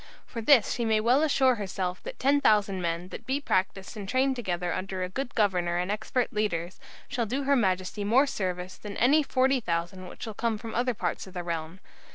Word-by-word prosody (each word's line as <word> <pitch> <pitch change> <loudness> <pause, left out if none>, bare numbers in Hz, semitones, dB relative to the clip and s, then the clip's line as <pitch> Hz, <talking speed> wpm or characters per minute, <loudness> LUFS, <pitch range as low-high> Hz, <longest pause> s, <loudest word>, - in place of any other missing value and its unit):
For 230 - -6
this 235 -1 +5
she 240 - -2
may 220 -1 +2
well 245 +6 +3
assure 270 -4 +4
herself 185 -4 -3
that - - -8
10,000 215 -9 +3
men, 170 +1 -2
that - - -9
be 270 +2 0
practised 190 -5 -1
and 200 -2 -6
trained 265 +2 +2
together 180 -7 -2
under 185 0 -3
a 180 - -3
good 245 +6 -4
governor 180 -5 +1
and 180 +2 -1
expert 230 +4 -1
leaders, 185 -5 -2 0.3
shall 245 -4 -2
do 270 +6 -2
her 280 +1 +3
Majesty 190 -2 0
more 240 +8 +4
service 185 -7 -3
than 205 -1 -7
any 285 +6 +5
40,000 190 - 0
which - - -10
shall 220 - -5
come 225 +1 -1
from 225 +1 -7
any 225 - -1
other 250 -1 0
parts - - -3
of 190 - -13
the 175 - -3
realm. 165 +1 -4
210 Hz, 205 wpm, -28 LUFS, 185-250 Hz, 0.3 s, this